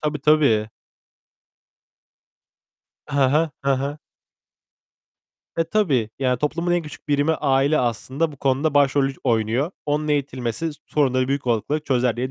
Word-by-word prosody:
Tabii, 150 -2 -2
tabii. 140 -8 +3 2.4
He 145 - -2
he. 155 +4 +3 0.2
He 135 -1 +3
he. 140 +2 -2 1.6
E, 165 - +2
tabii. 155 - +1
Yani, 125 -2 +1
toplumun 170 +4 -1
en 175 -1 +1
küçük 150 0 -12
birimi 145 +2 +2
aile 140 +1 +2
aslında 130 +6 -1
bu - - -12
konuda 140 +3 0
başrolü 140 -1 +3
oynuyor. 120 - +1 0.2
Onun 150 +1 -1
eğitilmesi 140 0 -1 0.2
sorunları 130 -3 +1
büyük 140 -2 -2
olasılıkla 120 +6 0
çözer 125 -5 0
diye 130 +2 -2
140 Hz, 125 wpm, -22 LUFS, 130-150 Hz, 2.4 s, tabii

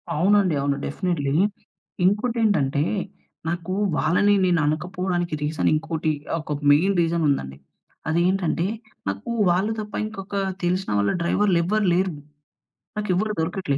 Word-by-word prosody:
అవునండి. 185 0 +3
అవును. 140 0 0
డెఫినిట్లీ. 145 -3 -1 0.7
ఇంకోటేంటంటే, 205 - +2 0.6
నాకూ, 175 +2 -2 0.2
వాళ్ళనీ 180 +6 +3
నేననకపోవడానికి 175 +2 0
రీజనింకోటి. 155 +1 0 0.3
ఒక 150 - -7 0.2
మెయిన్ 185 +7 +4
రీజనుందండి. 150 - 0 0.5
అదేంటంటే, 175 0 +1 0.4
నాకూ 100 - -3 0.2
వాళ్ళు 190 +5 +2
తప్ప 210 0 -6
ఇంకొకా 200 -2 -5 0.2
తెలిసిన 180 +2 0
వాళ్ళ 100 0 +2
డ్రైవర్‌లెవ్వరు 195 +2 +2
లేరు. 185 -2 +1 0.8
నాకెవ్వరు 210 +1 0
దొరకట్లే. 160 -3 -1
175 Hz, 95 wpm, -23 LUFS, 155-195 Hz, 0.8 s, మెయిన్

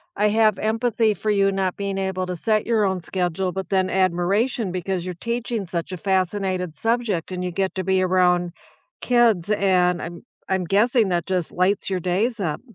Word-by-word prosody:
I 210 0 +2
have 215 -2 +3
empathy 225 0 +1
for 215 +3 -1
you 195 -1 +3
not 190 -2 -1
being 200 -1 -3
able 190 -1 -2
to 180 - -3
set 215 +4 0
your 225 -2 +2
own 190 -1 0
schedule, 180 +1 -2
but 190 +1 -5
then 190 -1 +1
admiration 190 +4 +1
because 185 0 -3
you're 180 -1 -5
teaching 235 +1 -3
such 170 +1 -4
a 185 - -4
fascinated 185 -2 -1
subject, 225 -7 -1
and 180 0 -3
you 180 - -2
get 190 +2 -1
to 190 - -2
be 190 0 +2
around 180 -1 +2 0.5
kids, 230 -7 +3
and 180 -3 +2
I'm 170 0 -7 0.3
I'm 190 -1 +1
guessing 215 +4 +3
that 175 -2 0
just 185 -3 -2
lights 190 +3 0
your 190 -1 -1
days 200 +7 0
up. 165 -6 -2
190 Hz, 190 wpm, -23 LUFS, 180-210 Hz, 0.5 s, have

